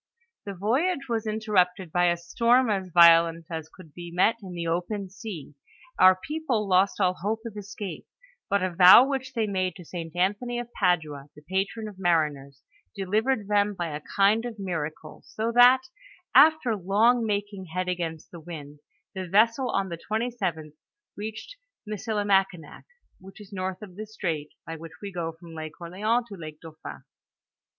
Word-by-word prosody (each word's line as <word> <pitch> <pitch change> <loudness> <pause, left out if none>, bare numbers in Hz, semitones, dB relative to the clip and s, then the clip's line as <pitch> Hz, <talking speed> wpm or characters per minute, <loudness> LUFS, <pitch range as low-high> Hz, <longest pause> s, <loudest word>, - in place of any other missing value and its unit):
The 200 -1 -6
voyage 275 - 0
was 225 -2 -2
interrupted 190 -5 0
by 175 +1 +2
a 175 0 +2
storm 235 +8 +2
as 190 -2 -2
violent 165 -1 +6
as 160 -1 -5
could 165 -6 -16
be 175 -1 -8
met 180 +6 +2
in 185 -3 -9
the 170 -1 -4
open 180 +4 -3
sea; 190 -8 -8 0.5
our 185 0 +8
people 255 -1 -2
lost 190 +2 +2
all 185 -2 +3
hope 220 +3 -2
of 225 -2 -7
escape; 205 -1 -7 0.4
bnt 200 -2 +2
a 180 -2 -4
vow 185 +9 +9
which 265 -2 -3
they 225 -3 0
made 185 -3 -1
to 180 - -12
St. 165 -1 -7
Anthony, 205 +7 0
of 240 0 -6
Padua, 155 -7 0
the 150 - -15
patron 195 +6 -2
of 200 -3 -11
mariners, 150 -6 0 0.3
delivered 210 +3 0
them 205 0 +2
by 175 -2 -3
a 150 - -6
kind 205 +3 +4
of 240 -2 -6
miracle, 160 -5 -5
so 225 +2 -3
that, 245 +2 +7 0.5
after 310 -8 +5
long 210 +6 +3
ninking 205 -2 -3
head 180 +1 -2
against 170 -3 -4
the 170 - -9
wind, 150 -3 -10 0.3
the 185 -1 -5
vessel 230 +7 +3
on 195 -3 -1
the 170 -1 -6
27th 200 -10 -2 0.4
reached 220 - -7 0.3
Missilimakinak, 200 -6 -1 0.3
which 190 +2 -14
is 205 -1 -13
north 185 +1 -4
of 185 -4 -11
the 215 +2 -7
strait, 165 -8 -4 0.2
by 165 - -6
which 165 0 -10
we 200 -1 -7
go 170 -3 -3
from 165 0 -14
Lake 155 -1 -8
Orleans 210 +8 -1
to 200 - -8
Lake 155 -4 -9
Dauphin. 160 -1 -10
190 Hz, 170 wpm, -26 LUFS, 170-215 Hz, 0.5 s, vow